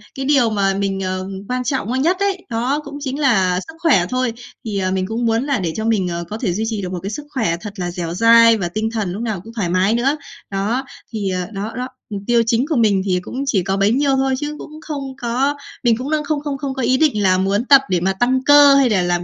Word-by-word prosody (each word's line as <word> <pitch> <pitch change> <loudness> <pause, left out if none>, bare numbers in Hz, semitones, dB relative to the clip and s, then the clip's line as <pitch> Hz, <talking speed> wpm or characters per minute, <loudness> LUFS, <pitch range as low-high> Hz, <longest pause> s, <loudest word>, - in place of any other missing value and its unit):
cái 270 - -4
điều 270 -5 +3
mà 195 -2 +1
mình, 195 0 -2
ờ, 185 0 -3 0.2
quan 250 0 -1
trọng, 255 -4 -2
ơ, 260 - 0
nhất 340 +7 +2
ấy, 395 -2 -1
đó 245 +6 0
cũng 285 0 -8
chính 275 0 -4
là 190 -10 +2
sức 320 - -10
khỏe 265 - +3
thôi. 255 -2 -1 0.3
Thì, 205 -2 -3
ờ, 185 0 -1
mình 190 0 -1
cũng 230 +2 -2
muốn 230 +2 +1
là 280 -6 0
để 165 -3 -2
cho 220 - -3
mình, 210 -5 +1
ờ, 170 0 -3
có 215 - -4
thể 200 -8 -1
duy 215 +4 -2
trì 215 -3 -3
được 180 -1 -5
một 180 - -3
cái 195 - -3
sức 290 +7 -6
khỏe 220 - -1
thật 210 -2 -7
là 175 -1 -2
dẻo 170 -2 -4
dai 230 +2 +6
và 175 -3 -2
tinh 215 +4 -2
thần 210 -6 -2
lúc 210 - -5
nào 215 -6 -3
cũng 225 +1 -12
thoải 200 -7 -2
mái 185 +4 +2
nữa. 270 +6 +1 0.3
Đó, 220 +7 -1 0.3
thì, 205 -3 -2
ờ 180 -1 -2
đó, 205 +3 -4
đó, 250 +1 -3 0.2
mục 200 -2 -5
tiêu 235 -1 +4
chính 230 +3 +1
của 315 - -1
mình 210 -5 +3
thì 180 -2 +1
cũng 260 +8 -5
chỉ 200 -10 +1
có 195 +1 -1
bấy 200 +2 +3
nhiêu 275 +1 +2
thôi 265 0 +1
chứ 295 +1 -4
cũng 310 0 -10
không 280 -4 -5
có 260 +5 0 0.3
mình 230 -2 +3
cũng 265 +4 -5
đang 305 -1 +1
không 290 -1 -2
không 285 -2 -3
không 270 -1 -4
có 265 - -4
ý 255 +2 +2
định 265 -10 +2
là 185 -1 +4
muốn 200 +5 0
tập 275 -1 +7
để 180 -2 +2
mà 190 +2 0
tăng 255 +6 +1
cơ 290 0 +7
hay 275 -3 +4
là 195 -4 +2
làm 175 0 0
230 Hz, 280 wpm, -19 LUFS, 195-270 Hz, 0.3 s, tập